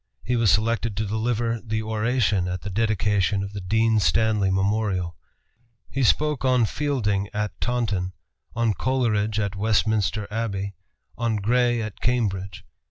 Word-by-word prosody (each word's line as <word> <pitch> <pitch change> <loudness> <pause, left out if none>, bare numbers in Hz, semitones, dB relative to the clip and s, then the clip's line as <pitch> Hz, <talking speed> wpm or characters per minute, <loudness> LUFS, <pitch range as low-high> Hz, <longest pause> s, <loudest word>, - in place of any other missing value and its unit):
He 125 - 0
was 115 -3 +3
selected 110 +2 +1
to 110 - 0
deliver 115 +2 -1
the 110 -1 -2
oration 110 -3 +1
at 90 0 -3
the 100 - -5
dedication 105 -2 +1
of 100 0 -7
the 100 - -5
Dean 110 +3 +2
Stanley 105 +4 +2
Memorial. 95 -2 0 0.8
He 135 - -1
spoke 150 +4 +2
on 125 -3 +4
Fielding 105 -8 -1
at 105 0 -3
Taunton, 105 -7 -1 0.4
on 115 -2 +2
Coleridge 110 -4 0
at 100 -2 -1
Westminster 105 0 +1
Abbey, 100 -3 -2 0.5
on 115 -2 +1
Gray 120 +3 +2
at 105 -2 -7
Cambridge. 100 -6 -1
110 Hz, 140 wpm, -24 LUFS, 100-115 Hz, 0.8 s, on